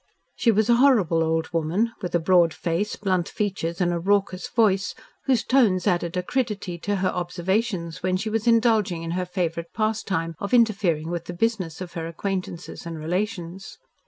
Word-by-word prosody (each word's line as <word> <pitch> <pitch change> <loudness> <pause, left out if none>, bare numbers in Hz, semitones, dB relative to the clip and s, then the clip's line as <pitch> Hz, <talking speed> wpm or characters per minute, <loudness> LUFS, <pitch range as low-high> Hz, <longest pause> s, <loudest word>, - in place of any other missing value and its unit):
She 235 - +2
was 220 -1 +3
a 235 -1 +5
horrible 210 - +4
old 160 0 -1
woman 170 +8 +1
with 180 -3 -3
a - - +4
broad 170 -1 +4
face, 175 +5 -1
blunt 185 -4 0
features 185 -5 -2
and 175 -1 +2
a 170 - -1
raucous 195 0 0
voice, 195 -4 +2 0.3
whose 255 -5 +2
tones 225 -9 +3
added 175 -2 0
acridity 200 -3 -2
to 205 +4 -1
her 190 -1 0
observations 180 0 -2
when 185 0 +1
she 215 +3 -3
was 225 +1 -1
indulging 220 -7 +3
in 165 - -4
her 180 +1 -2
favourite 170 -2 -3
pastime 205 -7 -1
of 200 +5 0
interfering 190 -9 +2
with 170 -1 -3
the 175 - -6
business 185 -5 -1
of 180 -2 -7
her 165 -1 -4
acquaintances 180 -1 -5
and 165 -1 -5
relations. 180 +2 -4
185 Hz, 175 wpm, -24 LUFS, 170-215 Hz, 0.3 s, a